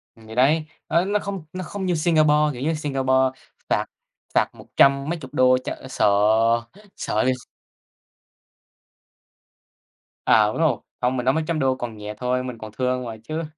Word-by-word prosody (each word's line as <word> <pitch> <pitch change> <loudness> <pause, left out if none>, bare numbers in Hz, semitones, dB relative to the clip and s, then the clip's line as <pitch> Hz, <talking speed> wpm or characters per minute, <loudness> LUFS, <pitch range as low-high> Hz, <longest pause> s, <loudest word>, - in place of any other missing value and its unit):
Thì 110 0 -12
đấy, 150 +5 +3 0.2
nó 170 +3 +3
nó 205 +1 +1
không 195 -6 -5
nó 185 0 -4
không 190 +3 -5
như 180 -2 +1
Singapore, 155 -2 +3 0.2
kiểu 125 - -8
như, 160 +3 0
Singapore 135 -3 -1 0.6
phạt - - +1 0.5
phạt - - +3
một - - -14
trăm 140 +2 +4
mấy 170 -1 -2
chục 130 -2 -11
đô 130 0 +5
cho - - -4
sợ - - +2 0.9
sợ 110 +3 0
x 130 0 +1 2.9
À, 105 -1 +5
đúng 105 - -3
rồi, 160 -3 +2 0.2
không, 125 +1 +1
mình 125 - -2
nói 130 - +4
mấy 160 - 0
trăm 165 -2 0
đô 130 -1 +2
còn 120 -4 -6
nhẹ 105 0 -6
thôi, 125 0 -1
mình 125 -2 -6
còn 110 -1 -9
thương 125 0 0
rồi 115 -2 -7
chứ. 160 +5 -4
130 Hz, 175 wpm, -23 LUFS, 125-160 Hz, 2.9 s, đô